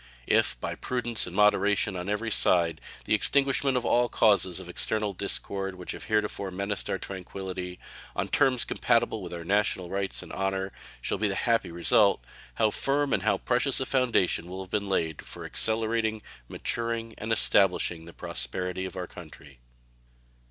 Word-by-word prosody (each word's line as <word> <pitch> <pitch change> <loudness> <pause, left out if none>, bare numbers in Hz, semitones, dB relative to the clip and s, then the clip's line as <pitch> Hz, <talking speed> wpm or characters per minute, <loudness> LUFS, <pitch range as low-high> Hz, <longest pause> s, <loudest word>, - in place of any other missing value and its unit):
If - - +2
by - - -3
prudence 120 -4 -1
and 90 - -8
moderation 105 -1 +3
on 90 +2 -4
every 110 +2 -1
side 85 -4 +3 0.2
the - - +1
extinguishment 135 +3 +4
of 125 - -2
all 120 0 +3
the - - -12
causes 100 -4 +3
of 95 - -10
external 105 +3 -1
discord 95 0 -3
which 90 -1 -7
have - - -8
heretofore 105 -2 -1
menaced 100 +2 -3
our - - 0
tranquillity, 95 -1 -6 0.4
on - - -1
terms 130 -4 +2
compatible 115 -2 +1
with 90 - -7
our 85 -1 -6
national 95 -1 0
rights 100 0 -2
and - - -11
honor, 95 0 -2 0.3
shall - - -1
be 105 - +2
the 100 - -2
happy 115 +2 +1
result, 85 - +3 0.3
how 110 - +2
firm 140 +4 0
and - - +2
how 105 -2 +2
precious 125 +5 +1
a 130 - -1
foundation 120 -10 +1
will 95 +1 -6
have 95 - -15
been 100 -2 -1
laid 80 -5 -1
for - - -9
accelerating, 110 -1 +1 0.2
maturing, 115 - -3
and 110 +1 -4
establishing 90 -6 +3
the 85 - -11
prosperity 90 +12 -3
of 95 - -7
our 90 - -3
country. 75 -7 -13
100 Hz, 170 wpm, -27 LUFS, 90-115 Hz, 0.4 s, extinguishment